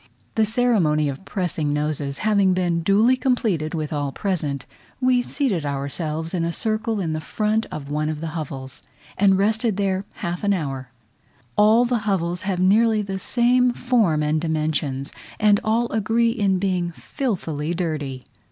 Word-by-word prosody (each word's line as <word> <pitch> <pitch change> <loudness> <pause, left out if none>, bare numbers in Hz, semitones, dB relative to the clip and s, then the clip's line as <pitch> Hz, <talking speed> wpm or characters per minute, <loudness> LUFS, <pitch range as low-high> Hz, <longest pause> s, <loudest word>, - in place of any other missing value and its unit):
The 220 -1 +2
ceremony 195 - +2
of 140 +7 -7
pressing 165 -6 -1
noses 150 -2 -2
having 200 -3 +3
been 175 -2 0
duly 210 +8 +4
completed 220 - 0
with 155 -1 -3
all 145 -2 -1
present, 150 -8 -2 0.3
we 255 -1 +3
seated 240 - -1
ourselves 150 +4 -3
in 175 -2 0
a 170 - 0
circle 220 +3 -1
in 165 -5 -1
the 155 - -3
front 215 +6 0
of 140 -2 -7
one 150 +1 0
of 155 -1 -3
the 165 +1 -4
hovels, 135 -5 -6 0.3
and 195 -1 +4
rested 220 +1 +1
there 195 -1 0
half 175 +2 -4
an 200 -1 +3
hour. 135 -6 -4 0.7
All 220 +3 +5
the 240 -1 +1
hovels 175 -2 0
have 185 -2 -1
nearly 215 +3 +4
the 195 -1 -4
same 245 +3 +3
form 225 -13 +2
and 150 +1 +1
dimensions, 155 -4 -1 0.3
and 210 -1 +4
all 230 +2 +1
agree 225 +2 +2
in 200 -5 +1
being 180 -2 0
filthily 170 - -3
dirty. 150 -7 -3
185 Hz, 160 wpm, -23 LUFS, 155-215 Hz, 0.7 s, All